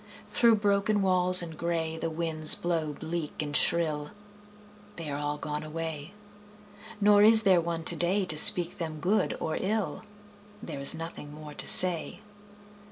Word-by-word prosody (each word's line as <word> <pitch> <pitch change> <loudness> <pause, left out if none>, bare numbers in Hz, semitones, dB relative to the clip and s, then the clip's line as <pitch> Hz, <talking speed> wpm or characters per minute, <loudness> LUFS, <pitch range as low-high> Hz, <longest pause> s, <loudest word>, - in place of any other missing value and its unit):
Through 235 -2 +2
broken 205 0 -2
walls 185 -1 +4
and 165 -2 -10
gray 165 -1 -5
The 165 0 -6
winds 160 -1 +2
blow 165 -3 -4
bleak 160 0 -8
and 145 -1 -5
shrill: 150 -3 0 0.9
They 160 -3 -9
are 140 - -6
all 145 0 -5
gone 150 0 -7
away. 160 +2 -9 0.8
Nor 205 0 +2
is 220 +1 +5
there 185 -4 +2
one 165 0 -6
today 185 +4 -2
To 155 - 0
speak 175 +3 +7
them 160 -2 -7
good 195 +8 -2
or 160 - -5
ill: 210 +1 -4 0.6
There 155 -8 -10
is 140 - +1
nothing 165 -2 -10
more 150 0 -13
to - - -3
say. 180 -1 +3
165 Hz, 155 wpm, -25 LUFS, 155-185 Hz, 0.9 s, speak